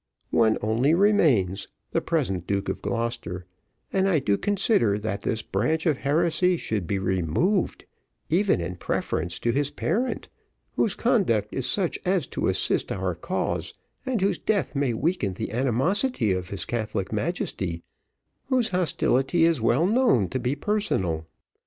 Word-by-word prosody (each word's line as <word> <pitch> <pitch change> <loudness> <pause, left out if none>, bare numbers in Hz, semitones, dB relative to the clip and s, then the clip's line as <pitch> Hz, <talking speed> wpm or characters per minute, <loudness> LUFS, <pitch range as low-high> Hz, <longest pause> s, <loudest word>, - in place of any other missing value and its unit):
One 110 -1 +3
only 120 +9 +2
remains, 140 - +3 0.2
the - - +1
present 90 -2 -1
Duke 100 0 -1
of - - -3
Gloucester, 115 -7 -3 0.5
and 195 0 +2
I 175 - +3
do 105 -8 +1
consider 195 - +2
that 105 -1 -3
this 110 - -2
branch 140 +11 0
of 155 -5 +2
heresy 170 +5 +2
should 105 - -3
be 100 - 0
removed, 95 - 0 0.4
even 190 - +2
in 90 +1 -4
preference 85 0 -2
to 120 - +1
his 145 +3 0
parent, 245 - -2 0.5
whose 210 - +1
conduct 175 - +1
is 130 -1 -1
such 180 +6 0
as 185 -1 +1
to - - 0
assist - - +1
our - - -1
cause, - - -3 0.3
and 260 -6 -1
whose 195 - +1
death 205 -4 0
may 140 -4 +1
weaken 120 - -1
the - - -4
animosity 130 - +1
of 90 0 -2
his 100 -2 -3
Catholic 110 -4 -3
Majesty, 100 - -2 0.6
whose 255 -4 +1
hostility 165 -3 +1
is 165 -7 +2
well 120 +8 +3
known 205 - +3
to 130 - -2
be 125 +3 -1
personal. 95 - -1
130 Hz, 150 wpm, -25 LUFS, -, 0.6 s, One